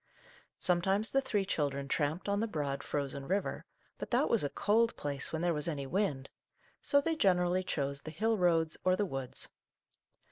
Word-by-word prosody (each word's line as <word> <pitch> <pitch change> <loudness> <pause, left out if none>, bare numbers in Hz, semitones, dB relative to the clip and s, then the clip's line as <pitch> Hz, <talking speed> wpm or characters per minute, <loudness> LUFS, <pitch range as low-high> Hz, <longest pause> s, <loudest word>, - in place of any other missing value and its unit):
Sometimes 190 +4 +2
the 270 - +3
three 205 -7 0
children 140 -6 -1
tramped 150 +6 -1
on 200 0 +1
the 225 - 0
broad, 145 -7 -2
frozen 140 -1 -3
river, 195 +2 -1 0.3
but - - -5
that - - +2
was 230 - +3
a 145 - 0
cold 225 +7 +2
place 140 -2 -2
when 160 +1 -2
there 175 -1 +2
was 150 0 -2
any 145 -4 -2
wind, 140 -5 -1 0.5
so 285 - +4
they 325 +3 0
generally 185 - +2
chose 140 -5 -2
the - - -7
hill 220 +8 +1
roads 165 -4 +2
or 185 0 +4
the 205 - 0
woods. 135 -7 -5
175 Hz, 180 wpm, -32 LUFS, 145-200 Hz, 0.5 s, so